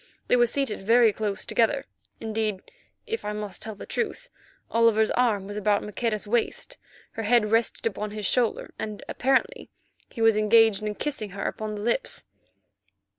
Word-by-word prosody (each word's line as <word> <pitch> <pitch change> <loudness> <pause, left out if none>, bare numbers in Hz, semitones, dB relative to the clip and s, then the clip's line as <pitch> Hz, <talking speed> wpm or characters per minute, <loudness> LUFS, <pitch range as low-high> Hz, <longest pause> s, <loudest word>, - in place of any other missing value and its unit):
They - - +5
were 240 -1 +4
seated 275 -4 -1
very 225 +2 +5
close 210 -2 -3
together; 240 +4 +1 0.3
indeed, 215 -3 -3 0.3
if 455 0 -4
I 210 - -3
must 210 -2 -5
tell 220 -1 -4
the - - -9
truth, 480 +2 -3 0.4
Oliver's 225 -1 +4
arm 225 -6 +1
was 205 +1 -6
about 210 0 +1
Maqueda's 215 0 -2
waist, 360 - -1 0.3
her 225 - -5
head 220 -1 +3
rested 225 +1 +1
upon 210 -1 -2
his 210 0 -5
shoulder, 240 +1 +1
and 210 -1 -5
apparently 270 - 0 0.4
he - - -11
was 225 -1 +5
engaged 215 -1 +4
in 210 0 -3
kissing 270 -7 -3
her 200 +1 -6
upon 215 -1 -3
the 205 - -6
lips. 350 - -1
220 Hz, 165 wpm, -26 LUFS, 210-240 Hz, 0.4 s, They